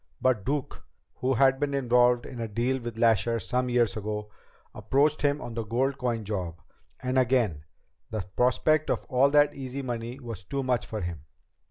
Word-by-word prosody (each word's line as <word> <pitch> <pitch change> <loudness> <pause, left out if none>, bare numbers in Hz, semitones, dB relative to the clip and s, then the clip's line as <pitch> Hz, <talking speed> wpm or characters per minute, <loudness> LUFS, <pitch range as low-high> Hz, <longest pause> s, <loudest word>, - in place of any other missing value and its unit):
But 125 -6 +2
Duke, 140 +3 -3 0.3
who 130 +1 0
had 135 +2 +4
been 145 -1 0
involved 125 -2 +3
in 125 - -8
a 115 - -2
deal 120 +5 0
with 120 -1 -6
Lasher 115 0 +3
some 125 +2 -1
years 120 -4 +2
ago, 105 0 -4 0.4
approached 140 +9 +1
him 145 0 +2
on 120 - -7
the 115 0 -3
gold 130 +5 -1
coin 120 -4 -1
job. 90 -5 -4 0.4
And 130 +1 +2
again, 115 - +1 0.4
the 110 - -3
prospect 155 +5 +2
of - - -1
all 135 +1 +4
that 145 0 +4
easy 135 0 -5
money 120 +1 -4
was 115 -7 -7
too 135 +7 -3
much 125 -3 0
for 110 -1 -4
him." 85 -4 -5
125 Hz, 180 wpm, -27 LUFS, 110-135 Hz, 0.4 s, had